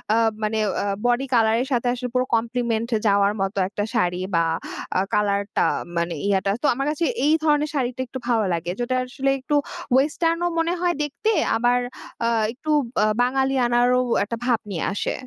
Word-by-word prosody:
আ - - +3 0.3
মানে 215 +1 0 0.3
আ - - -2 0.2
body 245 +2 +2
colour 220 -1 +4
এর 260 - -3
সাথে 245 0 0
আসলে 250 0 -4
পুরো 250 - +2
কমপ্লিমেন্ট 235 0 -1 0.2
যাওয়ার 200 0 +3
মতো 195 +1 -2
একটা 205 0 -3
শাড়ি 180 -4 0
বা 165 - +4 0.5
আ - - +4
কালার 205 -1 +2 0.2
টা - - +4 0.3
মানে 170 0 0
ইয়াটা। 195 0 +1
তো - - +4
আমার 275 +3 -2
কাছে 320 +2 -1 0.2
এই 305 - +4
ধরনের 300 -1 +2
শাড়িটা 255 -1 -1
একটু 260 - -6
ভালো 225 -4 +2
লাগে। 170 +1 -2
যেটা 250 +1 -1
আসলে 270 +2 -2
একটু 290 +3 -1 0.4
ওয়েসটার্ন 330 +5 +2
ও - - 0
মনে 335 +2 +1
হয় 350 -1 +2
দেখতে, 430 +10 -1 0.3
আবার 245 +1 +2 0.5
আ - - +3 0.2
একটু 305 +5 -4 0.3
বা - - +4 0.2
বাঙালি 265 +2 +1
আনারও 245 +1 +3 0.2
একটা 230 +3 -4
ভাব 240 -3 +2
নিয়ে 165 - -2
আসে। - - -2
245 Hz, 185 wpm, -23 LUFS, 210-270 Hz, 0.5 s, কালার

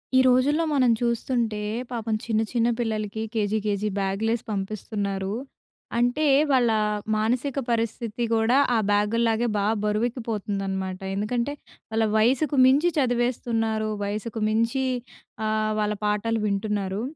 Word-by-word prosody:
ఈ - - +7
రోజుల్లో 275 +6 +3
మనం 255 -4 +4
చూస్తుంటే, 235 -2 0 0.3
పాపం 225 -3 -2
చిన్న 220 -2 +1
చిన్న 235 -1 +2
పిల్లలకి 220 -2 -2
కేజీ 215 -1 0
కేజీ 205 0 0
బ్యాగ్‌లేసి 205 +4 0
పంపిస్తున్నారు. 200 -1 -3 0.7
అంటే, 245 +6 +2 0.3
వాళ్ళ 250 -3 +4 0.5
మానసిక 245 +6 0
పరిస్థితి 230 0 -2
కూడా 225 +3 +3 0.2
ఆ - - +4
బ్యాగు‌ల్లాగే 225 +3 +2
బాగా 205 +2 +2
బరువెక్కిపోతుందనమాట. 205 -4 -2 0.2
ఎందుకంటే 235 +7 -1 0.4
వాళ్ళ 220 0 +2
వయసుకు 260 +6 +2
మించి 290 +7 +4
చదివేస్తున్నారు, 235 -4 0
వయసుకు 215 +2 -4
మించి 230 +5 +1 0.6
ఆహ్, 215 0 0
వాళ్ళ 210 0 0
పాఠాలు 210 +2 0
వింటున్నారు. 200 -1 -1
225 Hz, 110 wpm, -25 LUFS, 210-240 Hz, 0.7 s, ఈ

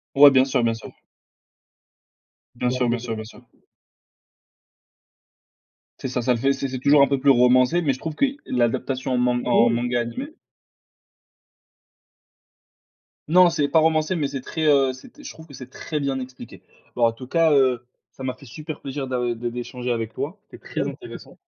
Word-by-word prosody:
Ouais, 140 +1 +9
bien 130 -1 +4
sûr, 130 -2 0
bien 115 -1 +1
sûr. 115 - -10 1.6
Bien 125 +1 -1
sûr, 125 -1 0
bien 120 0 0
sûr, 115 -1 -5
bien 110 0 -6
sûr. 115 - -14 2.6
C'est 130 - -4
ça, 125 -1 -2
ça 125 +1 +2
le 120 - -1
fait, 135 +3 +2
c'est - - -10
c'est 135 -1 -3
c'est - - -4
toujours 140 +2 +5
un 140 - +6
peu 135 0 -1
plus 140 - 0
romancé, 125 +6 +4
mais 140 -4 +1
je 130 - -7
trouve 160 +1 -5
que 220 - +1
y 275 +1 -2
l'adaptation 130 +2 -1
en 125 - +1
man 125 0 +1
en 120 -1 +4
manga 120 +1 0
animé. 255 - -5 3.0
Non, 180 +2 +6
c'est 150 -4 0
pas 165 - +3
romancé, 160 +2 +2
mais 145 -3 -1
c'est 135 - -5
très, 155 +4 -3
heu, 135 -3 +4
c'était, 240 - -15
je - - -8
trouve 160 0 -14
que 140 - -15
c'est 130 -1 -10
très 150 +1 -5
bien 135 -1 -1
expliqué. 125 -2 -10 0.3
Bah 120 - -2
en 115 -1 +4
tout 125 +3 -11
cas, 165 +3 +2
heu, 130 -4 +2 0.3
ça 130 - -11
m'a 130 -1 -2
fait 130 +1 -16
super 155 +6 -8
plaisir 135 0 -5
d'a 130 -1 -2
de 120 0 -2
d'échanger 125 +1 -4
avec 115 -1 -3
toi. 165 +8 -5
C'était - - -14
très - - -3
intéressant. - - -10
130 Hz, 195 wpm, -23 LUFS, 125-145 Hz, 3.0 s, Ouais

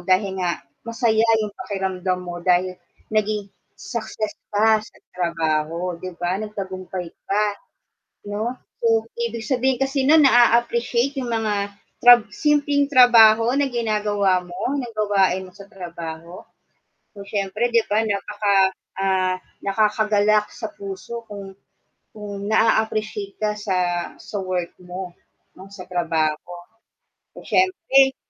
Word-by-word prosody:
dahil 190 0 +1
nga 175 -1 -2 0.2
masaya 225 -1 +1 0.2
yung 210 - -6
pakiramdam 190 -2 -2
mo, 175 -1 -7
dahil 180 +1 +2 0.4
naging 210 -2 -1 0.2
success 220 -3 -4 0.2
ka 215 +1 +4
sa 215 - -15 0.2
trabaho 170 0 -1
'di 185 -2 -7
ba, 175 +3 -2
nagtagumpay 190 -4 -6 0.2
ka, 210 +2 +2 0.9
'no, 220 +4 -2 0.2
so, 225 -1 +2 0.2
ibig 235 -1 -3
sabihin 260 -1 +1
kasi 270 0 0
nu'n 310 +1 +6
naa-appreciate 240 +2 +3
yung 255 - -2
mga 205 -3 -1 0.3
tra 245 -1 +9
simpleng 290 -1 +2
trabaho 230 -3 +7
na 285 - +2
ginagawa 210 -6 +1
mo 245 +10 -3
ng 240 -4 -5
gawain 195 -3 +1
mo 185 - -15
sa 200 -1 -12
trabaho. 170 -2 -8 0.7
So, 200 -2 -10
siyempre 205 +3 -1
'di 230 -2 +2
ba 215 - +4
napaka 200 -2 +1 0.2
ah, 190 -1 +1 0.3
nakakagalak 210 0 +2
sa 220 - -6
puso 200 +4 -7
kung 200 -2 -8 0.6
kung 205 -2 -6
na-aappreciate 215 -2 +1
ka 215 -1 0
sa 205 -3 -2 0.4
sa - - -8
work 180 -2 -3
mo, 180 0 -7 0.4
'no, 195 +1 -13
sa 195 -2 -10
trabaho, 165 -2 -1 0.8
so - - -11
siyempre 275 -8 +3
205 Hz, 125 wpm, -22 LUFS, 185-230 Hz, 0.9 s, tra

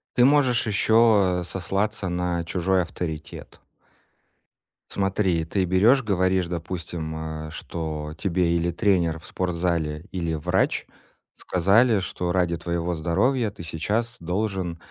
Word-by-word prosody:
Ты 125 - +5
можешь 130 -5 +3
ещё, 105 -3 +4
э, - - -4
сослаться 95 +4 -2
на 90 -1 -1
чужой 90 +2 +1
авторитет. 80 -4 -7 1.3
Смотри, 95 -4 +1
ты 95 +3 0
берёшь, 105 +9 +4
говоришь, 95 -3 +1
допустим, 80 -2 -5
э, - - -8
что 75 -2 -5
тебе 85 -2 +1
или 85 +1 0
тренер 85 -3 +1
в 80 - -17
спортзале, 85 -3 -2
или 85 -3 -2
врач 90 +5 0 0.5
сказали, 100 +5 +3
что 90 -1 -3
ради 90 -2 +1
твоего 85 +1 -2
здоровья 100 +9 +1
ты 100 -4 -10
сейчас 110 +10 -2
должен 90 -1 -2
90 Hz, 120 wpm, -24 LUFS, 85-100 Hz, 1.3 s, Ты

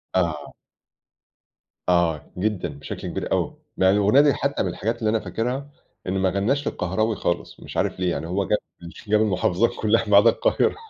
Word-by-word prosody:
آه. 80 -5 -1 1.4
آه، 85 -3 +1
جدًا 95 -3 -1
بشكل 70 0 -7
كبير - - -4
أوي، - - 0 0.2
يعني 95 +1 +4
الأغنية 105 +7 +5
دي 145 -1 +4
حتّى 140 0 -1
من 95 - -1
الحاجات 115 +6 -3
اللي 110 -2 0
أنا 110 - +2
فاكرها، 125 +6 -3 0.4
إن 95 +1 -1
ما 95 0 +2
غنّاش 110 +10 0
للقهراوي 110 +5 -1
خالص 85 -1 -3
مش - - -8
عارف - - 0
ليه 90 -1 +1
يعني 80 +1 -3
هو 95 +3 -1
جاب 105 - +3 0.5
جاب 105 +1 +3
المحافظات 95 +1 +2
كلّها 115 +1 +2
ما 100 - +7
عدا 115 +3 +7
القاهرة. - - +1
100 Hz, 175 wpm, -23 LUFS, 90-115 Hz, 1.4 s, ما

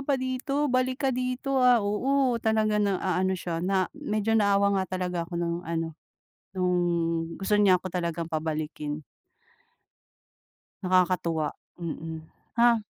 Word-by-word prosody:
pa 275 0 +1
dito, 260 +3 -1
balik 255 +2 0
ka 265 - +4
dito 255 +2 -1
ah." 250 -1 +6
Oo, 250 +3 +1
talaga 215 -1 +2
na 200 -2 +2
aano 190 +1 0
siya, 170 -2 -3
na 190 +1 +2
medyo 225 -7 -1
naawa 200 -2 +3
nga 185 0 -3
talaga 180 -2 -2
ako 175 - -5
no'ng 170 0 -1
ano, 165 -1 -3 0.6
no'ng 170 -2 0
gusto 210 +2 +1
niya 195 -3 +6
ako 185 0 -2
talagang 170 -2 -3
pabalikin. 155 -1 -3 1.8
Nakakatuwa, 180 -4 +1 0.3
mm, 160 -1 -5 0.4
ha. 235 -2 +4
185 Hz, 130 wpm, -27 LUFS, 170-235 Hz, 1.8 s, ah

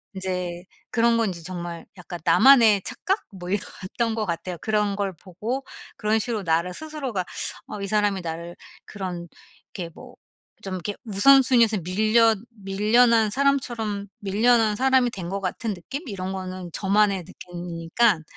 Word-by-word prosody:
인제 180 -2 -3 0.3
그런 235 0 +3
건 225 -2 +2
인제 170 -3 -7
정말 175 -1 -6
약간 175 -1 -8
나만의 230 -7 +6
착각 395 0 -1
뭐 180 -2 -8
이랬던 210 +3 -2
것 220 - -1
같아요. 175 0 -4
그런 210 -2 0
걸 200 -2 -1
보고 210 - -5 0.3
그런 215 +1 +1
식으로 220 -1 -2
나를 170 +2 +1
스스로가 275 -8 -4 0.4
어 210 - -6
이 200 - -3
사람이 205 -2 +1
나를 170 +1 -6 0.3
그런 180 -4 -6 0.5
이렇게 175 -4 -4
뭐 - - -13 0.5
좀 190 -1 -4
이렇게 195 +3 -4
우선순위에서 235 +1 +5
밀려 220 +5 +3
밀려난 220 +1 +2
사람처럼 240 -7 0
밀려난 215 +2 +3
사람이 260 +1 +3
된 180 -5 -6
것 200 +1 -3
같은 205 +4 -2
느낌 270 - -7
이런 190 -3 -4
거는 185 -1 -6
저만의 200 -1 +2
느낌이니깐 175 +2 -1
205 Hz, 315 characters per minute, -24 LUFS, 185-230 Hz, 0.5 s, 나만의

